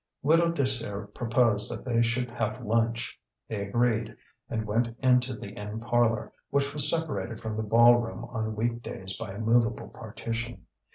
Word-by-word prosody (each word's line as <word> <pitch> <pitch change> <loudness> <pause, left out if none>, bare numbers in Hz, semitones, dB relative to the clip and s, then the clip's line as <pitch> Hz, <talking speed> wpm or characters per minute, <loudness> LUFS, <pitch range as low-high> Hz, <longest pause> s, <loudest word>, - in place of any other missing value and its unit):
Widow 165 +3 +4
Désir 115 -9 -2
proposed 115 -3 +2
that - - -6
they 120 -2 +2
should 120 +1 0
have 115 +1 -3
lunch. 115 +2 0 0.3
They 110 -2 -3
agreed, 115 +1 0 0.3
and 110 -1 -2
went 115 +2 -1
into 125 -1 +3
the 100 - -8
inn 105 +2 -6
parlour, 120 -1 +1 0.2
which 140 0 0
was 150 0 +7
separated 150 -9 -2
from 110 -1 -4
the 110 - -1
ball 120 +3 +6
room 120 -1 -4
on 110 -2 -4
weekdays 110 -4 -3
by 110 -2 -6
a - - -8
movable 115 +1 +1
partition. 115 -4 -6
115 Hz, 160 wpm, -28 LUFS, 110-120 Hz, 0.3 s, was